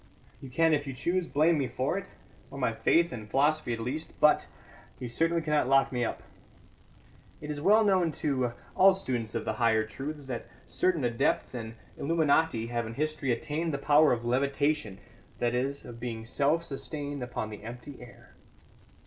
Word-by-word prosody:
You 135 Hz, -, -8 dB
can, 165 Hz, +5 st, +3 dB
if 145 Hz, -1 st, 0 dB
you 135 Hz, -, -4 dB
choose, 170 Hz, +7 st, -1 dB
blame 155 Hz, +2 st, +3 dB
me 135 Hz, -, 0 dB
for 130 Hz, +6 st, -1 dB
it, 195 Hz, 0 st, -4 dB, 0.4 s
or 140 Hz, -, -9 dB
my 125 Hz, -4 st, 0 dB
faith 165 Hz, +9 st, +3 dB
and 110 Hz, -4 st, -7 dB
philosophy 145 Hz, +2 st, +2 dB
at 115 Hz, -, -2 dB
least; 145 Hz, +8 st, -4 dB
but 150 Hz, -, +4 dB, 0.5 s
you 125 Hz, -, -5 dB
certainly 165 Hz, +7 st, 0 dB
cannot 150 Hz, -4 st, +1 dB
lock 135 Hz, 0 st, +4 dB
me 125 Hz, -2 st, -1 dB
up. -, -, -3 dB, 1.2 s
It 150 Hz, 0 st, -6 dB
is 145 Hz, -1 st, -4 dB
well 210 Hz, +6 st, +5 dB
known 185 Hz, -5 st, +3 dB
to 130 Hz, -6 st, -1 dB, 0.2 s
all 190 Hz, 0 st, +6 dB
students 125 Hz, -, -3 dB
of 115 Hz, -, -2 dB
the 110 Hz, -, -1 dB
higher 110 Hz, -2 st, +3 dB
truths 145 Hz, +6 st, -6 dB
that 125 Hz, -3 st, -5 dB, 0.2 s
certain 180 Hz, -6 st, 0 dB
adepts 120 Hz, +1 st, 0 dB
and 115 Hz, -2 st, -6 dB, 0.2 s
illuminati 160 Hz, -5 st, +2 dB
have 120 Hz, -1 st, -2 dB
in 115 Hz, -, -7 dB
history 155 Hz, -2 st, -1 dB
attained 155 Hz, +5 st, -2 dB
the -, -, -1 dB
power 150 Hz, +2 st, +5 dB
of 120 Hz, -1 st, -1 dB
levitation 140 Hz, -2 st, 0 dB, 0.4 s
that 120 Hz, 0 st, 0 dB
is, 135 Hz, +3 st, -2 dB
of 115 Hz, -1 st, -9 dB
being 115 Hz, -2 st, -5 dB
self 145 Hz, +7 st, +1 dB
sustained 145 Hz, -1 st, -5 dB
upon 120 Hz, -3 st, -4 dB
the 105 Hz, -, -8 dB
empty 120 Hz, +5 st, -9 dB
air. 120 Hz, 0 st, -15 dB
140 Hz, 180 wpm, -29 LUFS, 120-155 Hz, 1.2 s, all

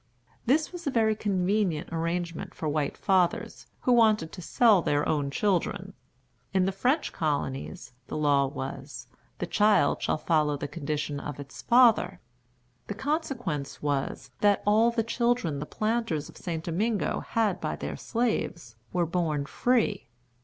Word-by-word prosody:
This 305 Hz, +5 st, +2 dB
was 350 Hz, -3 st, -7 dB
a -, -, +3 dB
very 220 Hz, -4 st, +2 dB
convenient 190 Hz, -4 st, 0 dB
arrangement 170 Hz, 0 st, -3 dB
for 160 Hz, -, -4 dB
white 145 Hz, -1 st, -1 dB
fathers, 185 Hz, -3 st, 0 dB
who 250 Hz, -, +1 dB
wanted 215 Hz, -8 st, +4 dB
to 180 Hz, -, -8 dB
sell 210 Hz, +2 st, +4 dB
their 145 Hz, -2 st, +1 dB
own 145 Hz, -3 st, 0 dB
children. 190 Hz, +3 st, -1 dB, 0.6 s
In 185 Hz, -1 st, +4 dB
the 195 Hz, -, +1 dB
French 255 Hz, -, 0 dB
colonies, 145 Hz, -1 st, -3 dB
the -, -, -4 dB
law 145 Hz, -2 st, +3 dB
was, 135 Hz, -2 st, -6 dB, 0.3 s
"the -, -, -2 dB
child 200 Hz, -3 st, +3 dB
shall -, -, 0 dB
follow 150 Hz, -2 st, +1 dB
the 145 Hz, -, -4 dB
condition 145 Hz, -1 st, -3 dB
of 145 Hz, 0 st, -6 dB
its 140 Hz, -1 st, -9 dB
father." 240 Hz, -1 st, +4 dB, 0.7 s
The 205 Hz, -, -4 dB
consequence 245 Hz, -, -3 dB
was, 145 Hz, -2 st, -2 dB
that 205 Hz, -1 st, +3 dB
all 215 Hz, +3 st, +5 dB
the 235 Hz, -1 st, 0 dB
children 235 Hz, -, 0 dB
the 150 Hz, -, -5 dB
planters 215 Hz, -9 st, -1 dB
of -, -, -14 dB
St. 165 Hz, -3 st, -4 dB
Domingo 205 Hz, +6 st, 0 dB
had 215 Hz, -5 st, 0 dB
by -, -, -2 dB
their -, -, -5 dB
slaves 195 Hz, -, -2 dB
were 175 Hz, -1 st, +1 dB
born 160 Hz, -4 st, -1 dB
free. 220 Hz, -, +1 dB
180 Hz, 150 wpm, -28 LUFS, 150-220 Hz, 0.7 s, all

